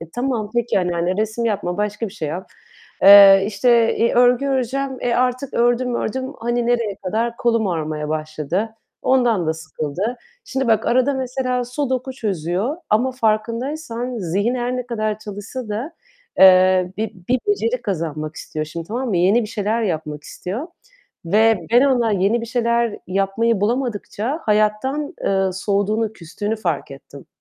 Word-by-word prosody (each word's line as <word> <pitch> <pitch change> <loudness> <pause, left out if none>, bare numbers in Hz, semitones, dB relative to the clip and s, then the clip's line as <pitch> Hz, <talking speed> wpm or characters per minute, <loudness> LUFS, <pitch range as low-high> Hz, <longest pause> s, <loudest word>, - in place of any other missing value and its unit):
E, 165 0 -10
tamam, 240 -2 -2
peki, 240 -4 +1
anneanne 175 0 -1
resim 220 +2 -1
yapma, 195 -5 -1
başka 210 +2 -2
bir 190 - -14
şey 160 -8 -4
yap. 180 +5 -6 0.5
Eee, 195 0 +9
işte, 225 +3 +3
i 230 - +2
örgü 245 +2 +4
öreceğim, 265 0 -1
e, 240 -1 0
artık 255 +2 0
ördüm 245 +1 +2
ördüm, 260 +4 -3
hani 240 +1 -1
nereye 235 -4 0
kadar 230 +5 -1
kolum 230 -2 +1
ağrımaya 155 -4 -3
başladı. 155 +7 -3 0.3
Ondan 240 -9 +2
da 160 - +2
sıkıldı. 160 - -4 0.3
Şimdi 265 - -2
bak, 225 -1 +2
arada 255 +3 +2
mesela 255 -1 -2
sudoku 260 0 -2
çözüyor 200 - -2
ama 245 +5 +2
farkındaysan 240 +2 -2
zihnen 200 +7 0
her 245 +1 -1
ne 250 - -4
kadar 215 -3 -2
çalışsa 215 +3 -7
da, 235 +10 -4 0.5
eee, 185 -1 +6
bi 220 0 -3 0.2
bir 255 +1 +3
beceri 225 +4 0
kazanmak 155 -5 -3
istiyor 155 0 -5
şimdi, 165 +1 -7
tamam 245 +4 -3
mı? 200 - 0
Yeni 195 +7 +3
bir 215 - -5
şeyler 220 +1 -1
yapmak 155 -6 -3
istiyor 235 - -6 0.6
ve 215 +5 +3
ben 245 +2 +6
ona 240 -5 +2
yeni 200 +5 +2
bir 230 - -6
şeyler 235 -1 0
yapmayı 195 +4 0
bulamadıkça 240 +4 -2
hayattan, 215 +8 0
eee, 195 -1 +2
soğuduğunu, 205 +3 0
küstüğünü 205 +4 -4
fark 170 -10 -3
ettim. 135 0 -12
220 Hz, 155 wpm, -20 LUFS, 190-245 Hz, 0.6 s, Eee